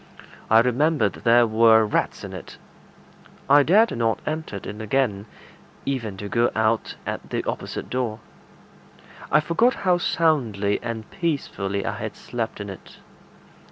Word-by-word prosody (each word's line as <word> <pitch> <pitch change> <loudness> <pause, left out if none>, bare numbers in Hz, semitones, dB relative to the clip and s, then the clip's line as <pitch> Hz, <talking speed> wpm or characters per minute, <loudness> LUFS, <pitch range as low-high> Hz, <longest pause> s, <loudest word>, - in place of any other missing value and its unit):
I 110 +1 +7
remembered 145 +6 +1
there 120 0 +4
were 110 0 +5
rats 105 - -1
in - - -7
it. - - -9 0.9
I 145 +1 +7
dared 210 +10 +4
not 115 -1 0
enter 155 -7 -4
it 100 - -7 0.2
again, 110 -3 0 0.6
even 115 -8 -3
to 100 - -6
go 120 +3 +2
out 110 +1 0
at - - -5
the - - -2
opposite - - -5
door: 120 -3 -2 1.1
I 150 - +6
forgot 225 +11 +2
how 180 -1 +3
soundly 120 - +1
and 115 -2 -5
peacefully 105 - -2
I - - -3
had - - -5
slept 115 -3 -5
in 100 - -5
it. 95 - -13
115 Hz, 140 wpm, -23 LUFS, 110-150 Hz, 1.1 s, I